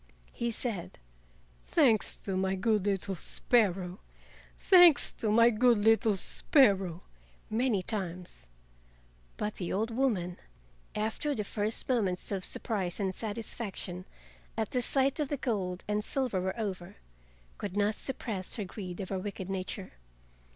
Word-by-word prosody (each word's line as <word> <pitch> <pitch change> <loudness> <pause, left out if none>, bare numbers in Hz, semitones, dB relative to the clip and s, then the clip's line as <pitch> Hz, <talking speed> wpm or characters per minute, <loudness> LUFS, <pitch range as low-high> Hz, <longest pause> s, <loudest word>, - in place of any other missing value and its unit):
He 235 - -2
said: 225 -6 -1 0.7
"Thanks 245 -10 +3
to 195 - -5
my 190 0 0
good 210 0 +1
little 195 0 -1
sparrow! 190 -2 +1 0.6
Thanks 355 -5 +7
to 220 - -3
my 230 +2 +6
good 240 +1 +4
little 220 0 +3
sparrow!" 195 - +2 0.5
many 220 -4 +1
times. 180 - -5 0.9
But 210 0 -2
the 180 - -3
old 220 +4 -1
woman, 215 -9 0 0.6
after 220 +7 -1
the 210 - -2
first 210 +2 -2
moments 205 -9 0
of 195 -2 -2
surprise 190 -5 0
and 190 -2 -1
satisfaction 205 -4 -5 0.5
at 220 -2 -2
the 250 - 0
sight 270 +3 +1
of 295 -3 -1
the 290 - -1
gold 190 -8 -2
and 210 0 0
silver 250 -7 0
were 190 +5 -3
over, 190 -5 -4 0.6
could 200 -1 -4
not 205 +1 +2
suppress 215 -7 -3
the 210 -5 -3
greed 185 -2 -7
of 190 - -6
her 190 - -2
wicked 195 -1 -5
nature. 190 0 -4
210 Hz, 135 wpm, -30 LUFS, 185-230 Hz, 0.9 s, Thanks